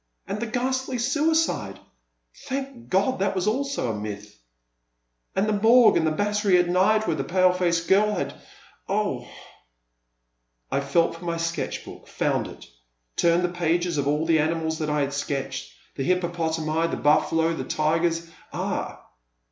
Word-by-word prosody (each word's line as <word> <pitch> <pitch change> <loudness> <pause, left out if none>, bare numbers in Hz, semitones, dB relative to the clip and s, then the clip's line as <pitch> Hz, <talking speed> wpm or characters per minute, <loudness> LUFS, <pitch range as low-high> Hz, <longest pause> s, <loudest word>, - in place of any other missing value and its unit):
And 205 - -4
the 235 - -3
ghastly 260 +2 -1
stiidde! 285 - +1 0.7
Thank 270 -2 -5
God 200 +8 +1
that 195 0 0
also 215 +3 +2
was 280 0 -3
a 115 - -1
myth, 105 0 -7 0.5
— - - -49
and 195 +2 +1
the 215 - +1
Morgue 225 +3 +6
and 160 - +2
the - - +2
Battery 205 +2 +2
at 175 0 +3
night 195 +5 +3
where 160 - 0
that 135 - -2
pale 185 0 +4
faced 170 -2 0
girl 210 +2 +4
had - - -3 0.6
—ugh! - - -1 1.5
I - - +1
felt 140 +5 +1
for 170 - -11
my 170 -1 -1
sketch 165 -1 -3
block, - - -12
found - - -1
it; - - -12 0.5
turned 170 +1 +3
the 180 - +1
pages 175 -1 0
of 140 - -1
all 150 +2 +1
the 165 -1 +3
animals 160 +1 -1
that 155 -1 -2
I 150 0 +1
had 140 0 -1
sketched, 135 -2 -3 0.2
the - - -5
hippopotami, 165 -2 0
the - - -3
bufficdo, 160 +2 +2
the - - -4
tigers 165 +2 0
— - - -28
ah - - -4
170 Hz, 165 wpm, -25 LUFS, 155-210 Hz, 1.5 s, Morgue